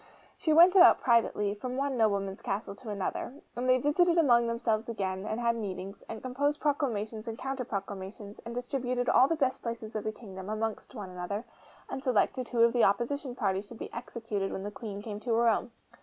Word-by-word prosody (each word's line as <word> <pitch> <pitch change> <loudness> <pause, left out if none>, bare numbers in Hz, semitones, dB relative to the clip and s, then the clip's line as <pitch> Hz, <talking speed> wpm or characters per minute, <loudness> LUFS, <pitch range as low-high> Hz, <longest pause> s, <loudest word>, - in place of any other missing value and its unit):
She 315 - -1
went 345 +4 +7
about 365 -1 +8
privately, 225 -4 +2
from 250 +5 -5
one 275 -1 0
nobleman's 200 -4 +1
castle 200 +1 -3
to 220 +3 -10
another; 205 +5 -3 0.2
and 250 +1 -1
they 255 - +6
visited 335 +6 +3
among 240 -7 +5
themselves 230 -1 -1
again, 195 -3 -3
and 220 - -2
had 235 -1 +2
meetings, 195 -3 -5
and 225 - -6
composed 285 +4 0
proclamations 230 -7 -1
and 225 0 -4
counter 270 0 -3
proclamations, 200 0 -6
and 235 +1 -7
distributed 245 0 -1
all 260 - +6
the 330 - +1
best 265 -4 0
places 230 -2 -5
of 215 - -2
the 215 - -1
kingdom 195 -3 -9
amongst 215 +3 -3
one 200 -5 -6
another, 180 +5 -4 0.4
and 265 - -5
selected 255 +1 +1
who 235 -2 +3
of 235 - +5
the 240 - +3
opposition 245 +6 +1
party 195 -5 0
should 215 +3 -12
be - - -7
executed 225 -4 -4
when 190 - -4
the 205 - -4
Queen 205 -2 -7
came 210 -2 -5
to 230 +1 0
her 235 +1 +3
own. 230 +2 +2
230 Hz, 200 wpm, -30 LUFS, 205-255 Hz, 0.4 s, about